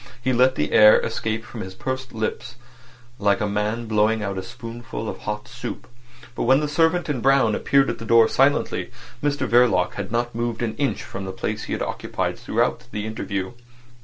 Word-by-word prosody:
He 130 Hz, +1 st, 0 dB
let 130 Hz, +2 st, +4 dB
the 75 Hz, -, -1 dB
air 105 Hz, 0 st, +8 dB
escape 110 Hz, 0 st, -3 dB
from 115 Hz, -1 st, -8 dB
his 95 Hz, -1 st, -7 dB
pursed 130 Hz, +2 st, -4 dB
up -, -, -15 dB
lips 115 Hz, +2 st, -3 dB, 0.6 s
like 100 Hz, +1 st, +2 dB
a 105 Hz, -, 0 dB
man 105 Hz, +3 st, -1 dB
blowing 110 Hz, 0 st, +2 dB
at 100 Hz, -1 st, -3 dB
a 95 Hz, -, -3 dB
spoonful 115 Hz, 0 st, -7 dB
of -, -, -5 dB
hot 105 Hz, 0 st, -5 dB
soup. -, -, -7 dB, 0.5 s
But -, -, -2 dB
when 130 Hz, +3 st, +5 dB
the 150 Hz, -, -1 dB
servant 165 Hz, +3 st, +2 dB
in 140 Hz, -6 st, -2 dB
brown 135 Hz, -4 st, +4 dB
appeared 140 Hz, +4 st, +3 dB
at -, -, -3 dB
the 115 Hz, -, -7 dB
door 115 Hz, 0 st, +6 dB
silently, 135 Hz, +4 st, +1 dB, 0.3 s
Mr 145 Hz, -1 st, 0 dB
Verloc 115 Hz, -7 st, +3 dB
had 100 Hz, -1 st, -5 dB
not 120 Hz, +1 st, -1 dB
moved 120 Hz, 0 st, -2 dB
an 110 Hz, -2 st, -2 dB
inch 140 Hz, -2 st, -1 dB
from 95 Hz, -, -7 dB
the 95 Hz, -, -4 dB
place 95 Hz, -, -4 dB
he -, -, -4 dB
had -, -, -1 dB
occupied -, -, -3 dB
throughout -, -, -1 dB
the 105 Hz, 0 st, -4 dB
interview. 100 Hz, -3 st, -3 dB
115 Hz, 200 wpm, -23 LUFS, 105-130 Hz, 0.6 s, air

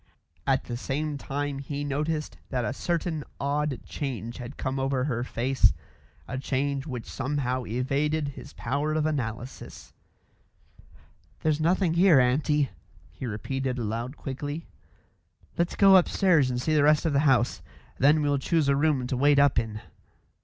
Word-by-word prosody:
At 135 Hz, -1 st, +2 dB
the 120 Hz, -, -5 dB
same 145 Hz, +3 st, -3 dB
time 140 Hz, 0 st, -3 dB
he 145 Hz, +1 st, -4 dB
noticed 150 Hz, +2 st, -2 dB
that 125 Hz, -3 st, -1 dB
a 110 Hz, -, -1 dB
certain 165 Hz, 0 st, -2 dB, 0.2 s
odd 145 Hz, -1 st, -1 dB
change 120 Hz, -5 st, -5 dB
had 125 Hz, +2 st, -8 dB
come 135 Hz, 0 st, -2 dB
over 135 Hz, -1 st, 0 dB
her 120 Hz, -4 st, -1 dB
face, 130 Hz, +2 st, +2 dB, 0.5 s
a 130 Hz, -, -4 dB
change 140 Hz, +1 st, -1 dB
which 125 Hz, -5 st, -5 dB
somehow 130 Hz, -2 st, -2 dB
evaded 140 Hz, +5 st, 0 dB
his 140 Hz, 0 st, -10 dB
power 145 Hz, +5 st, -1 dB
of 155 Hz, -1 st, +1 dB
analysis. 125 Hz, -5 st, -4 dB, 1.5 s
"There's 155 Hz, -1 st, +1 dB
nothing 175 Hz, +1 st, +2 dB
here, 170 Hz, -4 st, +6 dB
aunty," 140 Hz, +2 st, +2 dB, 0.4 s
he 130 Hz, -, -6 dB
repeated 130 Hz, +4 st, -3 dB
aloud 115 Hz, +4 st, -3 dB
quickly. 145 Hz, +4 st, -5 dB, 0.9 s
"Let's 170 Hz, +1 st, 0 dB
go 195 Hz, -1 st, +7 dB
upstairs 175 Hz, -6 st, +4 dB
and 125 Hz, -1 st, -1 dB
see 155 Hz, +5 st, 0 dB
the 150 Hz, -, +4 dB
rest 150 Hz, +2 st, +4 dB
of 160 Hz, -, +1 dB
the 140 Hz, -, +3 dB
house. 120 Hz, -2 st, +2 dB, 0.4 s
Then 150 Hz, +3 st, +5 dB
we'll 145 Hz, -1 st, +1 dB
choose 160 Hz, +1 st, +1 dB
a 140 Hz, -, +4 dB
room 145 Hz, -3 st, +2 dB
to 125 Hz, -, -2 dB
wait 140 Hz, +3 st, +4 dB
up 140 Hz, -3 st, +5 dB
in." 110 Hz, -2 st, -5 dB
140 Hz, 155 wpm, -27 LUFS, 130-150 Hz, 1.5 s, go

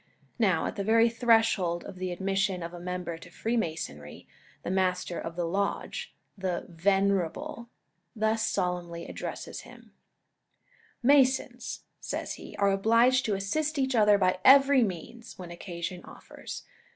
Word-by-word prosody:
Now, 190 Hz, -8 st, +2 dB
at -, -, -4 dB
the 200 Hz, -, -1 dB
very 225 Hz, +3 st, +4 dB
threshold 225 Hz, -7 st, +2 dB
of 195 Hz, -, -9 dB
the 185 Hz, 0 st, -3 dB
admission 195 Hz, 0 st, -1 dB
of 170 Hz, +1 st, -6 dB
a 175 Hz, -, -8 dB
member 180 Hz, -2 st, -4 dB
to 180 Hz, -, -13 dB
Freemasonry, 165 Hz, -, -4 dB, 0.4 s
the -, -, -3 dB
Master 185 Hz, -2 st, 0 dB
of 165 Hz, -, -6 dB
the 175 Hz, -1 st, -1 dB
Lodge, 200 Hz, -, -2 dB, 0.2 s
the 185 Hz, -3 st, -3 dB
"Venerable," 195 Hz, -, 0 dB, 0.5 s
thus 220 Hz, 0 st, +1 dB
solemnly 175 Hz, -1 st, -2 dB
addresses -, -, -6 dB
him: -, -, -16 dB, 1.1 s
"Masons," 265 Hz, 0 st, +2 dB, 0.2 s
says -, -, -4 dB
he, -, -, -10 dB
"are 200 Hz, -1 st, +3 dB
obliged 230 Hz, +6 st, +4 dB
to 210 Hz, -, +1 dB
assist 300 Hz, +11 st, -1 dB
each 265 Hz, -1 st, +1 dB
other 210 Hz, -3 st, +5 dB
by 185 Hz, -1 st, +2 dB
every 275 Hz, 0 st, +7 dB
means, 220 Hz, +3 st, -4 dB
when 180 Hz, -2 st, -8 dB
occasion 175 Hz, 0 st, -6 dB
offers. -, -, -9 dB
195 Hz, 140 wpm, -28 LUFS, 175-230 Hz, 1.1 s, every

